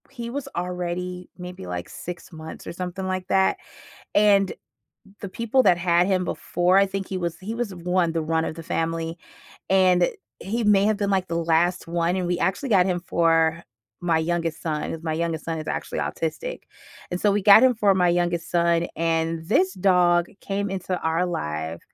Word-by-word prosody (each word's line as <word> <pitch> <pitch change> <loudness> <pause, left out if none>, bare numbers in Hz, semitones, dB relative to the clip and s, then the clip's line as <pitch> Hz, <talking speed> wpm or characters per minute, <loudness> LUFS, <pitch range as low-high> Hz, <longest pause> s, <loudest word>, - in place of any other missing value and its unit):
He 235 -1 -7
was 280 +3 -5
already 180 0 -4
maybe, 180 - -8
like, 90 -1 -4
6 175 +1 -8
months 160 0 -9
or - - -5
something 180 +2 -5
like 185 -1 -3
that, 190 0 +2 0.6
and 200 -2 +4 0.7
the 200 - -5
people 230 +6 +1
that 180 -6 +4
had 175 0 +3
him 185 -2 +1
before 180 +1 +1
I 200 - +6
think 195 0 -4
he 190 - -4
was 170 -2 -3
he 210 +4 -5
was 235 -3 -3
one 180 -1 0
the 165 -1 -1
run 160 +1 0
of - - -4
the 165 - -7
family, 165 +1 -2 0.5
and 185 -2 +4 0.3
he 230 +4 -2
may 200 -2 +4
have 215 0 +2
been 200 -1 -1
like 190 -2 0
the 170 - -2
last 170 +2 +1
one, 170 +1 0
and 185 -1 -1
we 175 0 0
actually 235 +8 -1
got 190 -4 +5
him 180 -2 0
for 165 0 +2 0.4
my 170 -2 +1
youngest 165 0 -1
son 155 -2 -3
as 165 - -7
my 160 - -1
youngest 165 0 -2
son 165 -1 -3
is 155 - -6
actually - - -3
autistic. - - -4 0.5
And 180 - -3
so 205 - +3
we 205 - +1
got 205 +3 +8
him 260 -1 +5
for 205 -3 +3
my 180 -1 +3
youngest 175 -1 0
son, 170 0 +2
and 165 0 -1
this 190 -2 +2
dog 180 -2 +3
came 200 0 -3
into 185 -1 -3
our 165 +2 +1
life 80 - -4
180 Hz, 195 wpm, -24 LUFS, 165-190 Hz, 0.7 s, got